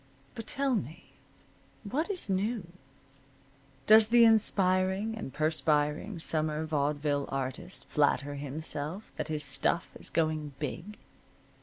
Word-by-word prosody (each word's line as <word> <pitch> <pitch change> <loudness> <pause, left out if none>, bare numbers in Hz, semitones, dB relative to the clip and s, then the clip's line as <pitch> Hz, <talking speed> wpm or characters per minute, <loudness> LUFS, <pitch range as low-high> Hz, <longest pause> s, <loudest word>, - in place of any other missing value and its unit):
But 225 -2 -8
tell 275 -1 0
me, 160 - -4 0.7
what 280 - -2
is 380 -3 -3
new? 200 +2 -1 1.2
Does 215 0 +7
the 235 +1 +6
aspiring 195 -1 +2
and 215 -11 -6
perspiring 155 +4 0
summer 155 -1 0
vaudeville 145 -1 -1
artist 135 +7 -5
flatter 145 -1 +1
himself 150 +6 -5
that - - -3
his 155 -2 -2
stuff 140 +4 +2
is - - -9
going 155 -3 -1
big? 170 +8 -6
160 Hz, 115 wpm, -30 LUFS, 150-210 Hz, 1.2 s, Does